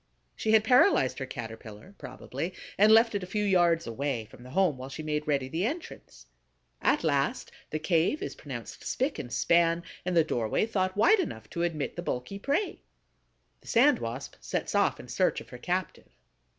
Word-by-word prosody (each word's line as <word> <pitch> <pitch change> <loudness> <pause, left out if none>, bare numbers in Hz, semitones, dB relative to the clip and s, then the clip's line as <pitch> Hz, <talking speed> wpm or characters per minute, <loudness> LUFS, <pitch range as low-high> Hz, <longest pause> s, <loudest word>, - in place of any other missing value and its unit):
She 220 - 0
had 220 -1 +6
paralyzed 220 - +4
her 135 - -4
Caterpillar, 115 - -9
probably, 175 +2 -6 0.2
and 210 +2 +5
left 225 +1 +6
it 205 - -1
a 180 - -6
few 210 +2 -1
yards 175 -4 +3
away 120 0 -3
from 110 +3 -16
the 125 - -11
home 180 0 +2
while 130 +1 -8
she 155 +3 -7
made 150 0 -2
ready 140 -3 +1
the 160 +7 -2
entrance. 230 - -5 0.6
At - - +2
last - - 0 0.2
the 155 - -2
cave 165 - +1
is - - -4
pronounced - - -8
spick 270 +3 -1
and 120 - -6
span, 170 0 +3 0.2
and 180 -1 -1
the 165 - +6
doorway 120 - 0
thought 190 -4 -1
wide 390 - +5
enough 110 - -4
to 170 - -3
admit 165 -3 -2
the - - -2
bulky 175 +5 -4
prey. 285 - -1 0.8
The - - -21
Sand 255 +2 +4
Wasp 120 +4 -6
sets - - -3
off - - +2
in - - -10
search - - +1
of - - -13
her - - -10
captive. - - -3
170 Hz, 190 wpm, -28 LUFS, 130-210 Hz, 0.8 s, had